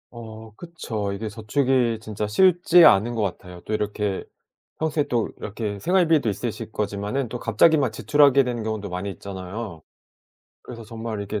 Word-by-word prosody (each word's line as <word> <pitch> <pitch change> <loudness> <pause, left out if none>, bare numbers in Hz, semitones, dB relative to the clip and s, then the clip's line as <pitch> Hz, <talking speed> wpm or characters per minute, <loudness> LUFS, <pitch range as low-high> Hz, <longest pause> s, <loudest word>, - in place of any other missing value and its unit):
어 110 -2 -10
그쵸. 110 - -5
이게 110 +2 -4
저축이 120 +2 0
진짜 105 -1 -4
쉽지 175 - +5
않은 120 -4 +5
것 115 - -1
같아요. 90 -2 -5
또 - - -9
이렇게 105 -2 -2 0.5
평소에 155 -1 0
또 120 -3 0
이렇게 105 -1 -5
생활비도 165 - +2
있으실 110 +1 -4
거지만은 105 +5 -2
또 120 - -5
갑자기 120 +9 +4
막 135 -6 +1
지출하게 140 +5 +4
되는 120 -2 -3
경우도 110 -2 -4
많이 90 +2 -4
있잖아요. 95 -1 -7 0.8
그래서 115 -2 -10
정말 110 -1 -6
이게 100 +1 -4
110 Hz, 355 characters per minute, -23 LUFS, 105-130 Hz, 0.8 s, 쉽지